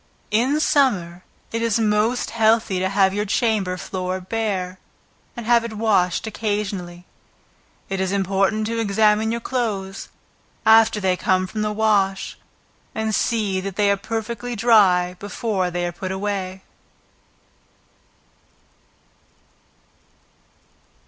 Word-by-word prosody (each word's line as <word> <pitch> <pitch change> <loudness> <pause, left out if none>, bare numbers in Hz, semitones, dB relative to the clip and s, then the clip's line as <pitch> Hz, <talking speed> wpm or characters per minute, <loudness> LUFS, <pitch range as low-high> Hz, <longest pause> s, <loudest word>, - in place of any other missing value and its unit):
In 255 +8 +2
summer 190 - +1 0.3
it 230 - -2
is 230 -1 +1
most 220 +3 +1
healthy 220 -4 +2
to 190 +1 0
have 195 -1 +3
your 205 +1 0
chamber 210 -4 0
floor 185 0 -4
bare, 190 -2 -3 0.6
and 235 - -6
have 235 0 +4
it 230 -1 -5
washed 205 -5 +1
occasionally. 200 -5 -3 0.8
It 195 0 -3
is 190 0 0
important 195 +2 +1
to 230 +1 -2
examine 215 +1 +2
your 235 0 -3
clothes, 210 -7 -3 0.6
after 220 -1 +5
they 190 -2 +1
come 185 +1 +1
from 215 +3 -5
the 210 0 0
wash, 205 -3 +1 0.6
and 220 0 -1
see 210 -5 0
that 195 -1 -5
they 205 -1 +3
are - - +3
perfectly 225 +3 -4
dry 200 -6 +4
before 205 -2 -2
they 175 0 -2
are 175 - -2
put 185 +2 -6
away. 190 -1 -3
205 Hz, 120 wpm, -22 LUFS, 190-225 Hz, 0.8 s, after